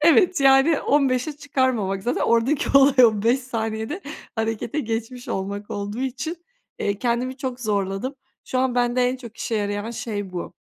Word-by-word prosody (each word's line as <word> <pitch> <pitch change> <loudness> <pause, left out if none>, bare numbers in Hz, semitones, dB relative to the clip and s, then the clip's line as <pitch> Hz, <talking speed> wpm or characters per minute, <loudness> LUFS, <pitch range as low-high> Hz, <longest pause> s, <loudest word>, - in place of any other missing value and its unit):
evet 335 +1 +5
yani 275 +3 +5
15'e 275 0 +2
çıkarmamak. 260 -9 0
Zaten 245 - -1
oradaki 235 +5 +2
olay, 270 -2 +6
o 215 -3 +3
5 245 +4 +3
saniyede 225 - -3 0.4
harekete 225 +5 -1
geçmiş 230 +2 -4
olmak 200 +2 -4
olduğu 205 +3 -4
için, 265 +5 -3 0.4
eee, 200 0 -1
kendimi 250 +2 -1
çok 260 -2 -4
zorladım. 205 +3 -1 0.3
Şu 255 - -2
an, 255 -1 +1
bende 245 0 +2
en 255 - -2
çok 235 -3 -11
işe 230 - -3
yarayan 205 +1 -2
şey 205 -5 -5
bu. 175 - -5
245 Hz, 155 wpm, -23 LUFS, 215-265 Hz, 0.4 s, olay